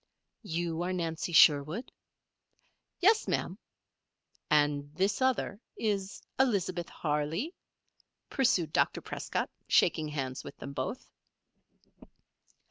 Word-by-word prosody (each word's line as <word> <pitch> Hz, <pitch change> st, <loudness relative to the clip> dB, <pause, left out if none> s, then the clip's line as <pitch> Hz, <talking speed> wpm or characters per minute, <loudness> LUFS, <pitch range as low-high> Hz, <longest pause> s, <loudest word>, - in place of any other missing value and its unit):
"You 170 Hz, -4 st, -2 dB
are 180 Hz, +1 st, -1 dB
Nancy 165 Hz, -1 st, -2 dB
Sherwood?" 155 Hz, -, +5 dB, 1.1 s
"Yes, 430 Hz, +4 st, +4 dB
Ma'am." -, -, -2 dB, 0.9 s
"And 145 Hz, -2 st, +2 dB
this 195 Hz, +7 st, +1 dB
other 255 Hz, -5 st, 0 dB, 0.2 s
is 200 Hz, -3 st, -2 dB, 0.2 s
Elizabeth 185 Hz, -9 st, +1 dB
Harley?" 155 Hz, -, -2 dB, 0.7 s
pursued 185 Hz, -, +1 dB
Dr. -, -, +2 dB
Prescott, -, -, -3 dB, 0.2 s
shaking 155 Hz, -, +3 dB
hands 135 Hz, -4 st, -4 dB
with -, -, -10 dB
them 140 Hz, -, -7 dB
both. 140 Hz, -, -4 dB
170 Hz, 95 wpm, -30 LUFS, 150-205 Hz, 1.1 s, Sherwood